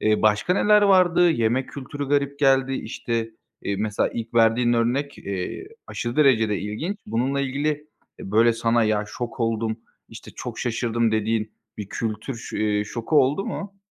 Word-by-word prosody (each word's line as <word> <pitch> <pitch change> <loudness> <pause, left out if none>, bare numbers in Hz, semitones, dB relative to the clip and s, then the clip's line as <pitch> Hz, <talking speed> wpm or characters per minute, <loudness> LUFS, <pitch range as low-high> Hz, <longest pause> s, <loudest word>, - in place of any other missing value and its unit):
eee, 110 0 +2
başka 105 +10 +3
neler 210 +1 +4
vardı? 180 -3 +5
Yemek 120 -2 0
kültürü 140 +1 -6
garip 140 0 0
geldi. 135 -2 +3
İşte, 115 -2 -3 0.3
iii, 100 - -2
mesela 105 0 0
ilk 115 0 -6
verdiğin 115 +1 +4
örnek, 125 +5 0
iii, 100 - -5 0.2
aşırı 120 0 -4
derecede 115 -8 +3
ilginç. 130 - -4
Bununla 125 +6 0
ilgili, 140 +2 -1
eee, 150 -9 -7
böyle 115 +3 +5
sana 115 0 +2
"Ya 105 -1 +1
şok 120 +4 -6
oldum, 115 -1 0 0.3
işte, - - -11
çok - - -7
şaşırdım." 115 -1 0
dediğin 110 0 0 0.3
bir 105 -2 -6
kültür 110 +5 -4
ş 115 - -6
iii, 105 -1 +1
şoku 115 +8 -2
oldu 145 +9 0
mu? 200 -1 -6
120 Hz, 160 wpm, -23 LUFS, 110-140 Hz, 0.3 s, vardı